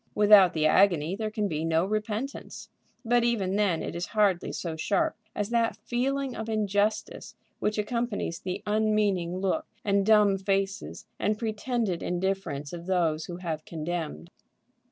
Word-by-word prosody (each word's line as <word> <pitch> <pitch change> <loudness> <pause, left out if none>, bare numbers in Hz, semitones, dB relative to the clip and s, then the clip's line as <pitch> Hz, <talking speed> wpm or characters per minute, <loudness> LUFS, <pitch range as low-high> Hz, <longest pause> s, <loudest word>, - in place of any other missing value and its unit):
Without 205 -3 +7
the 155 -1 +1
agony 175 0 +4
there 215 +1 -3
can 215 -1 -1
be 155 -3 -2
no 165 +1 +2
repentance. 215 +6 -4 0.4
But 240 +1 +3
even 205 -6 0
then 200 -6 +1
it - - -5
is 170 +1 -3
hardly 195 -4 +2
so 165 -3 -4
sharp 180 +6 0 0.2
as 210 +2 -2
that 230 -1 +1
feeling 265 +2 -2
of 220 0 -5
injustice 210 0 -1 0.2
which 210 +1 -1
accompanies 210 -5 -2
the 185 -1 -5
unmeaning 210 -4 +1
look, 195 +12 -1 0.2
and 200 -1 +3
dumb 205 -2 +4
faces, 195 0 -2
and 210 0 +1
pretended 220 -4 -2
indifference 180 -6 -2
of 170 0 -7
those 165 -4 +1
who 175 - -6
have 165 -4 -4
condemned. 155 - -5
200 Hz, 150 wpm, -27 LUFS, 175-215 Hz, 0.4 s, Without